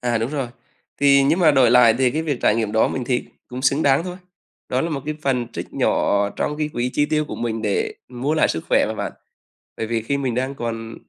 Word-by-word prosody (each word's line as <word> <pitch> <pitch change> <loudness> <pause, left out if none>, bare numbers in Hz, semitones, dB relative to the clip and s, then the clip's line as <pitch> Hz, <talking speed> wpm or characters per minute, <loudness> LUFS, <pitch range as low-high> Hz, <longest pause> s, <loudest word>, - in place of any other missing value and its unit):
À, 120 -2 0
đúng 115 +4 -2
rồi. 140 -5 -3 0.5
Thì 140 -1 +6
nhưng 150 +6 +2
mà 170 -4 +5
đổi 130 -5 +4
lại 120 -2 +6
thì 130 -2 +3
cái 155 +5 -2
việc 145 -5 -2
trải - - +4
nghiệm 110 -2 -1
đó 110 - +3
mình 130 - -3
thấy 125 0 -1 0.2
cũng 125 +1 -6
xứng 135 +3 +2
đáng 140 +3 +3
thôi, 180 -1 -6 0.5
đó 125 - 0
là 165 - -2
một 140 -3 -3
cái 155 - -2
phần 125 -4 0
trích - - -7
nhỏ 100 0 +1
trong 150 - -2
cái 150 0 -1
quỹ 125 -4 -2
chi 145 - +1
tiêu 155 0 0
của - - -7
mình 115 -2 -3
để 105 -3 -1
mua 130 +5 -2
lại 155 - +3
sức 80 - -3
khỏe - - +3
mà - - -3
bạn, - - -4 0.6
bởi 110 - -3
vì 115 0 -1
khi 140 +6 -1
mình 130 -4 -1
đang 130 +3 -2
còn 115 -3 -5
130 Hz, 255 wpm, -21 LUFS, 115-145 Hz, 0.6 s, Thì